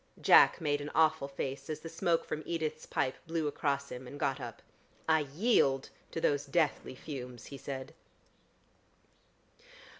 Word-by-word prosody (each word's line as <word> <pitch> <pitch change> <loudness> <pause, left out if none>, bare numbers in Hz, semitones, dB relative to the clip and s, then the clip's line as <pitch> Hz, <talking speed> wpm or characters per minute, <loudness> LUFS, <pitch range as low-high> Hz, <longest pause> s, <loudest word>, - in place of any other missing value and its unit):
Jack - - +7
made 145 -3 0
an 145 - -5
awful 160 -2 +3
face 135 +1 -5
as 155 0 -4
the - - -7
smoke 165 0 +1
from 155 - -3
Edith's 155 -2 -2
pipe 130 - 0
blew 165 -1 -1
across 140 -1 -1
him, 125 0 -7
and 145 +3 -9
got 135 -1 0
up. 120 -2 -8 0.4
"I 160 0 +5
yield 145 - +2 0.2
to - - -4
those 145 -2 +1
deathly 145 -3 0
fumes," 125 -4 -7
he 140 - -8
said. 130 -1 -6
145 Hz, 150 wpm, -32 LUFS, 135-160 Hz, 0.4 s, Jack